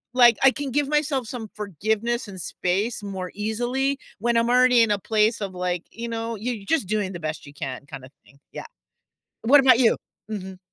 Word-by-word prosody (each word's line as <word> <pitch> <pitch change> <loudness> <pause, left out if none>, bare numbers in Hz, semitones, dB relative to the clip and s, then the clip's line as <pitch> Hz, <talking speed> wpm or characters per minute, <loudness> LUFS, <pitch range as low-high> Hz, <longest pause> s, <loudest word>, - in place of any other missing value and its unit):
like, 240 -3 +7
I 270 - +9
can 280 -2 -5
give 290 +1 +1
myself 290 -5 0
some 225 -4 -6
forgiveness 215 - -2
and 190 -3 -8
space 200 +8 -2
more 190 -2 -5
easily 245 +6 -1 0.2
when 235 +1 +1
I'm 230 +1 +2
already 250 -1 +5
in 220 - +1
a 205 - +2
place 220 +2 +1
of, 195 -2 -4
like, 180 -1 -2
you 235 +1 -6
know, 230 0 -3
you're 220 -2 -4
just 320 - +1
doing 205 -2 -1
the 175 - -6
best 155 -1 -4
you 140 - -12
can 135 -1 -6
kinda 130 -1 -9 0.2
thing, 140 - -22
yeah. - - -7 0.8
What 280 +5 +7
about 255 -3 +6
you? 235 - +4 0.3
Mhm. 190 -2 -6
220 Hz, 195 wpm, -24 LUFS, 190-245 Hz, 0.8 s, I